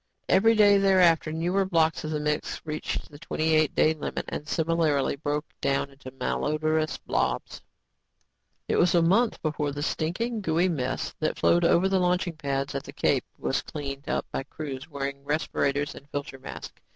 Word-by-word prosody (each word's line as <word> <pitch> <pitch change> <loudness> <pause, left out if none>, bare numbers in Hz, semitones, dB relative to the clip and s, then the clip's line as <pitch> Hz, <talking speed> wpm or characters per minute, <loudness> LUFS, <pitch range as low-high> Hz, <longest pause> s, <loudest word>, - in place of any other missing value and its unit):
Every 225 +4 +5
day 205 -2 +6
thereafter, 180 -5 +4
newer 175 +5 +1
blocks 165 -4 +1
of 155 - -3
the 155 -1 -1
mix 150 0 -2
reached 155 0 -4
the 145 - -12
twenty 160 0 -1
eight 155 -2 +3
day 155 - +4
limit 155 - -4
and 150 - -5
similarly 160 -4 +1
broke 145 +1 -2 0.2
down 140 0 0
into 135 -1 -11
malodrous 155 +4 -1
blobs. - - -2 1.1
It - - +1
was 175 0 +4
a 170 - +5
month 210 +7 +3
before 150 -2 -1
the 145 +1 -4
stinking, 215 +10 -1
gooey 170 0 +2
mess 130 -6 -2
that 155 - -1
flowed 175 0 +3
over 175 +3 +4
the 190 0 +2
launching 180 -1 +1
pads 140 -3 -2
at 140 - -2
the 140 - -10
Cape 140 -3 +1
was 130 -2 -1
cleaned 140 -2 -6
up - - 0
by - - -2
crews 140 +1 -7
wearing 140 -1 -4
respirators 145 -1 0
and 140 - -13
filter 140 -2 -5
masks. - - -9
155 Hz, 175 wpm, -27 LUFS, 140-170 Hz, 1.1 s, day